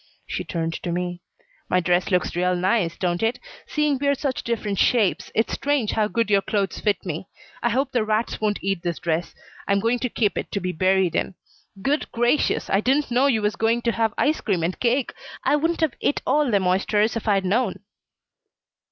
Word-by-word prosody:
She - - -4
turned 165 -1 -3
to 175 - -3
me. 175 0 -3 0.5
"My 180 - +3
dress 180 0 +1
looks 180 -3 0
real 180 +1 +1
nice, 180 -1 +1
don't 175 -1 -1
it? 225 +2 +1 0.3
Seeing 300 -3 +1
we're 280 0 +2
such 270 -1 -2
different 210 -4 -2
shapes, 195 -8 +2
it's 225 - +1
strange 280 -6 0
how 215 -1 +1
good 230 -1 -1
your 200 -1 +5
clothes 200 -1 -1
fit 205 -4 0
me. 175 +1 -4 0.3
I 240 - +2
hope 265 +4 0
the 245 -4 +1
rats 215 +1 -1
won't 210 -1 +1
eat 195 -2 -1
this 170 -1 -2
dress. 170 0 -2 0.3
I'm 200 0 +3
going 230 +4 +1
to 250 - -1
keep 215 -2 0
it - - -6
to 200 - 0
be 185 -1 -2
buried 185 0 +2
in. 195 - -1 0.5
Good 290 +5 0
gracious! 240 +5 +1
I 195 - +2
didn't 270 +3 +1
know 255 +3 +4
you 225 -6 +1
was 210 -1 +1
going 230 +2 +1
to 235 - +2
have 225 -1 0
ice 305 +2 +1
cream 185 -7 0
and 175 +2 -2
cake. 250 +2 +1 0.3
I - - +3
wouldn't 330 +3 0
have 315 -6 +2
et 290 - +1
all 290 +1 +2
them 200 -4 +2
oysters 205 +4 +2
if 230 - -4
I'd 195 -2 +2
known." 210 +2 0
210 Hz, 205 wpm, -23 LUFS, 185-245 Hz, 0.5 s, your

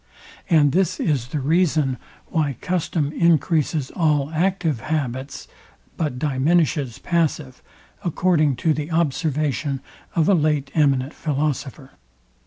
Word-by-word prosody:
And 150 -5 +5
this 185 +1 +1
is 135 -7 0
the 150 +3 -3
reason 150 -3 +1 0.3
why 150 -5 -1
custom 165 -4 -1
encreases 160 -3 +1
all 150 -3 +1
active 170 -5 0
habits, 140 -2 -3 0.5
but 150 -6 -2
diminishes 145 -1 +1
passive, 155 -6 -1 0.4
according 165 -4 +2
to 160 - +5
the 150 +1 -4
observation 150 -3 0 0.4
of 160 -2 +2
a 200 - +5
late 150 -4 +1
eminent 140 -2 +2
philosopher. 145 -2 -3
150 Hz, 110 wpm, -22 LUFS, 140-165 Hz, 0.5 s, And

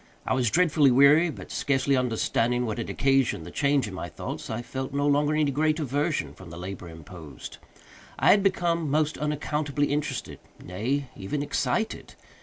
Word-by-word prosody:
I - - 0
was 125 -3 +1
dreadfully 155 -2 +4
weary, 140 +6 +6
but, 105 - -9
scarcely 140 0 +1
understanding 125 0 0
what 110 0 -3
had 115 - -4
occasioned 135 -10 +1
the - - -9
change 140 -3 +1
in 100 - -8
my 90 -1 -5
thoughts, 75 - -6
I 115 +2 -3
felt 130 +2 -5
no 145 0 +1
longer 145 +1 +2
any 150 -2 +2
great 155 +3 +1
aversion 145 +2 -1
from 95 -3 -13
the 85 - -9
labor 90 0 -7
imposed. 80 -1 -11 0.6
I - - +5
had 200 - +5
become 170 -5 +1
most 150 +1 0
unaccountably 150 -1 -1
interested—nay, 135 -3 -4
even 120 +10 -3
excited. 145 - -2
140 Hz, 165 wpm, -26 LUFS, 115-150 Hz, 0.6 s, weary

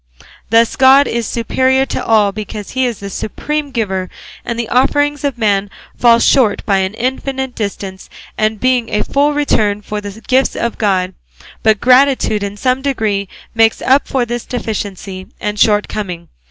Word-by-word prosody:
Thus, 230 +1 +3
God 270 +2 +6
is 235 -2 -2
superior 260 +3 +1
to 255 - -4
all 215 -4 +3
because 210 0 -7
he 260 -1 +1
is 235 -4 -4
the 200 - -5
supreme 300 +9 -3
giver, 190 -8 -2 0.3
and 235 - -4
the 235 -1 -2
offerings 290 +3 +1
of 280 -4 -1
man 205 -3 +1 0.3
fall 235 -1 +5
short 235 -3 +2
by 200 -2 +2
an 190 +2 -1
infinite 265 +2 -3
distance 200 -3 -5 0.3
of 215 0 0
being 250 -1 +1
a 210 0 0
full 290 +1 +1
return 210 -8 +1
for 210 0 -4
the 205 +1 -8
gifts 260 +1 +2
of 235 0 -3
God; 190 -3 +1 0.5
but 220 -2 +3
gratitude 255 -4 +3
in 200 0 -4
some 255 +3 0
degree 215 -8 -1 0.2
makes 225 0 +3
up 270 +2 +3
for 255 -3 0
this 240 0 -4
deficiency 200 -5 -5
and 210 0 -3
shortcoming. 205 -5 0
225 Hz, 165 wpm, -15 LUFS, 205-260 Hz, 0.5 s, God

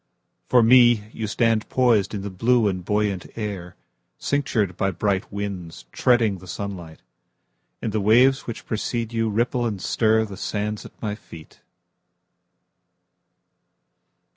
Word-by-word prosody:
For 125 -2 +5
me, 120 -3 +5
You 110 - -4
stand 115 0 +1
poisedIn 110 -6 +2
the 100 - -5
blue 115 +4 +2
and 95 -2 -2
buoyant 105 -1 -1
air, 100 -5 -5 0.4
Cinctured 115 -10 0
by 95 - 0
bright 95 +1 -1
winds, 95 -9 -6
Treading 115 -6 +2
the 95 - -13
sunlight. 90 -7 -7 0.8
And 110 - -1
the 110 0 -1
waves 125 +6 +4
which 115 - -6
precede 115 +1 -2
youRipple 115 +2 0
and 105 -4 -4
stirThe 110 -1 +1
sands 105 0 -3
at - - -23
my 105 -2 -1
feet. 85 -7 -13
105 Hz, 120 wpm, -23 LUFS, 95-115 Hz, 0.8 s, For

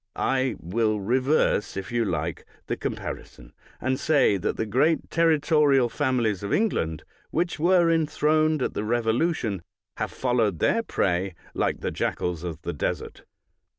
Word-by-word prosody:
I 130 -1 0
will 110 +4 0
reverse, 125 -2 +1
if 95 +2 -5
you 120 -1 +1
like, 80 -3 -2 0.2
the - - -2
compari - - -5
son, - - -17 0.3
and 130 +2 -1
say 145 -9 +3
that 95 - -2
the 110 - -1
great 135 +10 +1
territorial 150 -5 +3
families 115 -6 0
of 100 - -4
England, 80 - 0 0.3
which 170 0 -1
were 175 +1 +4
enthroned 155 -1 +2
at - - -2
the - - -2
Revo 115 +1 +1
lution, 120 - 0 0.4
have - - -2
followed 115 -7 0
their 230 - +2
prey 95 - -1 0.2
like - - -1
the - - -2
jackals 90 -2 -2
of 85 -2 -6
the 85 - -3
desert. 75 - -4
120 Hz, 150 wpm, -25 LUFS, 100-155 Hz, 0.4 s, were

